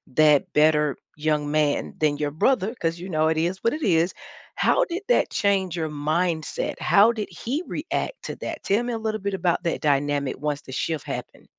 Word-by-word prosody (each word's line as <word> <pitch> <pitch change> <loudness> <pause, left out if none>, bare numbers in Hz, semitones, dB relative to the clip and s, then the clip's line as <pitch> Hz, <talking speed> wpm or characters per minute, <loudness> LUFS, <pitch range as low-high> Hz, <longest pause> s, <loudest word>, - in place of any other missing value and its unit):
that 150 -2 +4
better 150 -1 +3 0.2
young 150 -1 0
man 150 -1 +1
than 150 -2 +2
your 145 -1 -1
brother, 215 - +1
'cause 165 +1 -1
you 180 - -7
know 155 -1 +2
it 160 0 +1
is 175 +4 0
what 230 - +2
it 310 -1 -4
is, 170 -1 +2 0.4
how - - +3
did 360 +1 -5
that - - +3
change 195 -4 +1
your 160 -2 -2
mindset? 155 +2 -1
How 210 +3 +5
did 215 -3 -4
he 275 +8 -3
react - - -3
to - - -5
that? - - -6
Tell 205 +4 +2
me 240 -1 -3
a - - -1
little 220 -2 -3
bit 200 -1 -2
about 175 -2 0
that 170 - -1
dynamic 145 -1 +1
once 150 -1 -2
the 130 - -11
shift 155 +3 -2
happened. - - -7
165 Hz, 200 wpm, -24 LUFS, 150-200 Hz, 0.4 s, How